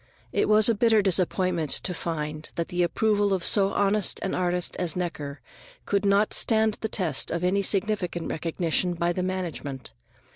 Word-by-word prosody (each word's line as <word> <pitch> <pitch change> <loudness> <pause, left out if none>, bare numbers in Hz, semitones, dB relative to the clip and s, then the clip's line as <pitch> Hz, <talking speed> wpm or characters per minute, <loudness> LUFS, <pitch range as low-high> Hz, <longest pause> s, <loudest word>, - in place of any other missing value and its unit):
It - - 0
was 215 0 +5
a 230 - +4
bitter 220 -1 +3
disappointment 185 -3 0
to 180 - -3
find 155 -2 -5
that 170 - -3
the 175 0 -1
approval 205 +3 +1
of 185 -2 -1
so 195 -2 +3
honest 200 0 +1
an 190 - -2
artist 180 -1 -1
as 170 -3 -1
Necker 155 -5 -4 0.4
could 200 0 0
not 200 +2 +2
stand 220 -1 +2
the 220 - -2
test 170 -10 0
of 170 +1 -3
any 190 +3 +2
significant 190 -3 0
recognition 170 +2 -1
by 170 +1 0
the 185 - -2
management. 170 -8 -5
180 Hz, 170 wpm, -26 LUFS, 170-205 Hz, 0.4 s, was